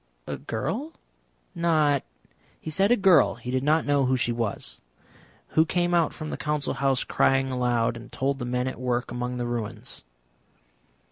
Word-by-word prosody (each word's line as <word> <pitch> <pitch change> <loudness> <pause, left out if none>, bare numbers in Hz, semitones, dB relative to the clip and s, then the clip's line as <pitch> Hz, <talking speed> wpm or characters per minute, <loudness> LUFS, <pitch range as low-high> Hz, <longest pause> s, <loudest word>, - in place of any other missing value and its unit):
"A - - -4
girl? 235 - -4 0.6
Not 155 -4 +2 0.3
?" - - -35
"He 160 - -6
said 195 +6 +3
a - - +7
girl 185 -6 +5
he 125 +1 -6
did 130 0 +1
not 155 +3 +2
know 145 -2 +3
who 130 0 +2
she 120 0 +1
was. 115 -3 -3 0.7
Who 160 - +4
came 175 +1 0
out 170 -3 +3
from 155 0 -6
the - - -3
Council 150 -1 -1
House 135 -2 +1
crying 135 0 +2
aloud, 120 -2 +1
and 120 +1 -10
told 135 +1 -1
the 120 - -3
men 125 +1 -1
at 130 - -5
work 125 -1 -1
among 125 +1 -3
the 120 - -2
ruins." 120 - -5
135 Hz, 180 wpm, -26 LUFS, 125-155 Hz, 0.7 s, a